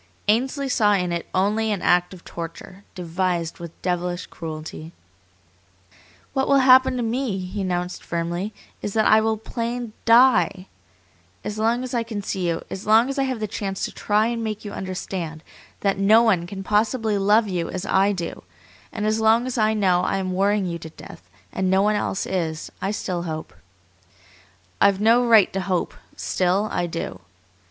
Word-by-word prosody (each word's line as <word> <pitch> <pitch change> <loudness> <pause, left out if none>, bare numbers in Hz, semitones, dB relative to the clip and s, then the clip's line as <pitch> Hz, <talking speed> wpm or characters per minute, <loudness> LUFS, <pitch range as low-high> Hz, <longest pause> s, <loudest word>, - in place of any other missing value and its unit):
Ainsley 260 +6 +1
saw 210 -5 +3
in 180 -3 0
it 170 -1 -3
only 210 +4 +1
an 200 - -2
act 175 0 +3
of 185 -3 -13
torture, 170 +3 -8
devised 175 -1 -2
with 170 -1 -9
devilish 180 0 -2
cruelty. 160 0 -8 1.4
"What 265 -1 0
will 280 - +5
happen 260 0 +6
to 245 - -1
me," 230 -2 -1
he 190 +2 -5
announced 180 -1 -3
firmly, 170 +4 -3 0.3
"is 205 - -4
that 220 -1 +3
I 215 0 +6
will 220 0 0
plain 235 +1 -4
DIE! 230 -6 +5 0.8
As 210 +1 -5
long 230 +3 +1
as 255 - -6
I 240 - +1
can 220 -3 -5
see 185 -2 -2
you, 165 - -2
as 195 +3 -7
long 225 +4 +5
as 275 0 -3
I 270 - +2
have 260 -3 -3
the 215 - -2
chance 195 -2 -3
to - - -6
try 210 +1 +1
and 230 0 -2
make 215 -1 -4
you 205 - -5
understand 180 -4 -5 0.4
that 195 -1 +1
no 215 +4 +6
one 185 -7 +2
can 195 +1 -7
possibly 215 +1 +1
love 210 +3 +4
you 175 -3 -2
as 185 0 -4
I 195 +2 +3
do, 175 -4 -5 0.5
and 210 -1 -3
as 215 +1 +1
long 225 +2 +4
as 255 - -3
I 215 0 +3
know 185 -4 +3
I 195 - 0
am 185 -1 -2
worrying 200 +1 +1
you 170 -1 -4
to 160 - -9
death, 90 - -13 0.2
and 190 -1 0
no 190 +1 +3
one 210 +1 +2
else 195 -1 -1
is, 160 -4 -3
I 195 - -1
still 185 -4 -3
hope. 160 -2 -5 1.3
I've 200 -1 +4
no 230 +3 +4
right 225 -5 +5
to 195 - -1
hope, 185 -2 -1 0.2
still 190 +4 0
I 175 -1 -1
do. 165 - -5
200 Hz, 185 wpm, -23 LUFS, 180-220 Hz, 1.4 s, happen